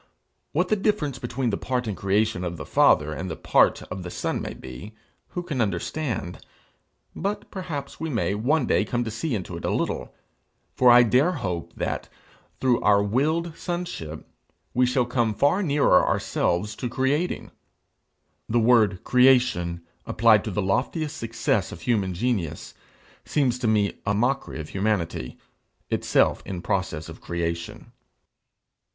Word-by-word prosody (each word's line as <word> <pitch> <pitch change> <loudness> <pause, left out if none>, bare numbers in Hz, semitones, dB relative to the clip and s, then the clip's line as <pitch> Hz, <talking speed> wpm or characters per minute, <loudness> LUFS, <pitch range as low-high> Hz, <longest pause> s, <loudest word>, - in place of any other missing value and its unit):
What 180 +4 0
the 215 - +4
difference 195 - 0
between 125 0 -2
the 100 - -2
part 125 -1 -1
in 105 - -2
creation 100 0 0
of 85 -1 -4
the 80 - -7
Father 75 +1 +4
and 90 +4 -5
the 80 - -4
part - - +3
of 90 0 -7
the 90 - -6
Son - - -2
may - - -5
be, 65 - -10 0.3
who 175 - -5
can 150 -8 -2
understand? 100 - -3 0.7
but 200 +3 -3
perhaps 155 -8 -6
we 160 +1 -3
may 115 -7 0
one 130 +7 +1
day - - +2
come 120 0 -1
to 110 - -4
see 125 +4 -2
into 95 -4 -5
it - - -9
a - - 0
little; - - -2 0.6
for 125 - +5
I 120 0 +8
dare 130 +10 +3
hope 90 - -4
that, - - -3 0.5
through 125 -2 +2
our 100 -1 +4
willed 155 +10 0
sonship, 175 - -5 0.5
we 125 0 +3
shall 125 0 +2
come 120 -3 0
far 145 - +3
nearer 145 - +4
ourselves 100 +5 0
to 125 - -3
creating. 140 +8 -1 1.0
The 120 +2 +3
word 110 -5 +3
creation 125 -10 +3 0.2
applied 110 -2 +4
to - - -2
the 105 0 -1
loftiest 145 - -1
success 115 -6 -1
of - - -9
human 100 -6 0
genius, 100 -6 -2 0.5
seems 130 -5 0
to 120 - -1
me 105 -2 +2
a 100 +1 0
mockery 125 -2 0
of 75 - -6
humanity, 95 -10 -2 0.5
itself - - +2
in 90 -3 -6
process 95 -6 -2
of 80 0 -11
creation. 85 0 -4
115 Hz, 155 wpm, -25 LUFS, 95-135 Hz, 1.0 s, I